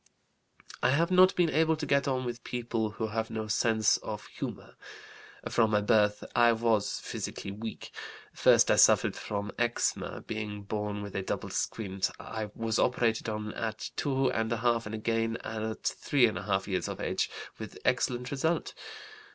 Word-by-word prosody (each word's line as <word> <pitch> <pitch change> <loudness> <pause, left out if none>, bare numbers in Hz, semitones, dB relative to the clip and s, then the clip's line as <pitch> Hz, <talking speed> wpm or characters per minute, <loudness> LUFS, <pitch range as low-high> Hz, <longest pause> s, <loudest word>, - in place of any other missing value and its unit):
I - - +3
have 165 +6 +2
not 185 +1 +6
been 170 -3 +3
able 160 0 +3
to 155 -1 -4
get 140 -1 +2
on 130 -2 0
with 120 -1 -5
people 115 -3 -2
who 110 - -2
have 110 +1 -2
no 110 -1 -3
sense 110 0 +3
of - - -6
humor. - - -7 0.7
From 115 -2 +3
my 105 -1 +2
birth 105 -1 +3
I 120 -1 +6
was 110 -2 +1
physically 100 - -5
weak. 110 +2 -7 0.4
First - - +5
I - - +4
suffered - - +5
from 100 0 -4
eczema. 120 0 0
Being 105 -2 -5
born 105 0 -3
with 100 - -8
a 100 - 0
double 95 - -4
squint, 95 -3 -1
I 110 -1 -5
was 115 0 -1
operated 115 -3 +1
on 105 0 -4
at 110 -1 -4
2½ 115 -4 +1
and 110 - -4
again 115 +1 0
at 110 0 -4
3½ 100 -7 +1
years 95 -4 -1
of - - -5
age, - - -1 0.3
with - - -7
excellent 125 0 0
result. 160 +4 0
110 Hz, 155 wpm, -30 LUFS, 105-125 Hz, 0.7 s, not